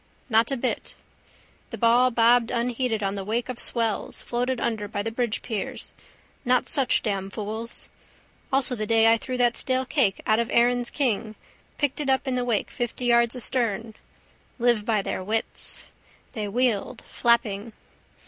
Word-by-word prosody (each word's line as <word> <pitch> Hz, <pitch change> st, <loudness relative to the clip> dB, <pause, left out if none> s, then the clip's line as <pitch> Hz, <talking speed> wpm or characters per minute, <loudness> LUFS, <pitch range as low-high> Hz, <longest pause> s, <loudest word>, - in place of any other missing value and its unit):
Not 225 Hz, +1 st, +4 dB
a 270 Hz, -, -1 dB
bit. 250 Hz, +1 st, -3 dB, 0.7 s
The -, -, -6 dB
ball 240 Hz, +2 st, +4 dB
bobbed 235 Hz, 0 st, +4 dB
unheeded 240 Hz, -2 st, -1 dB
on 195 Hz, 0 st, 0 dB
the 200 Hz, -1 st, -4 dB
wake 230 Hz, +5 st, -2 dB
of 250 Hz, -, -5 dB
swells, 230 Hz, -3 st, 0 dB
floated 245 Hz, +1 st, -1 dB
under 220 Hz, -3 st, -2 dB
by 205 Hz, 0 st, -3 dB
the 225 Hz, -, -3 dB
bridgepiers. 225 Hz, -2 st, -3 dB, 0.5 s
Not 250 Hz, -1 st, +2 dB
such 275 Hz, -5 st, +2 dB
damn 195 Hz, -3 st, -2 dB
fools. 220 Hz, +3 st, -4 dB, 0.6 s
Also 270 Hz, -1 st, +3 dB
the 215 Hz, -3 st, -3 dB
day 225 Hz, 0 st, +5 dB
I -, -, +2 dB
threw 255 Hz, +1 st, -4 dB
that 240 Hz, -1 st, +3 dB
stale 260 Hz, 0 st, 0 dB
cake 245 Hz, -8 st, +1 dB
out 215 Hz, +1 st, +3 dB
of 235 Hz, -, 0 dB
the -, -, -4 dB
Erin's 245 Hz, 0 st, +3 dB
King 225 Hz, -6 st, -1 dB, 0.4 s
picked 290 Hz, -2 st, 0 dB
it 290 Hz, -2 st, -2 dB
up 265 Hz, +1 st, +1 dB
in 260 Hz, -, 0 dB
the 250 Hz, 0 st, 0 dB
wake 235 Hz, -4 st, -1 dB
fifty 240 Hz, +1 st, -4 dB
yards 235 Hz, 0 st, +3 dB
astern. 230 Hz, -3 st, -1 dB, 0.6 s
Live 235 Hz, -4 st, +2 dB
by 215 Hz, -3 st, +1 dB
their 185 Hz, -, -3 dB
wits. 220 Hz, +3 st, -1 dB, 0.5 s
They 215 Hz, -3 st, -3 dB
wheeled, 235 Hz, +1 st, -1 dB
flapping. 230 Hz, -2 st, +1 dB
235 Hz, 165 wpm, -25 LUFS, 220-250 Hz, 0.7 s, day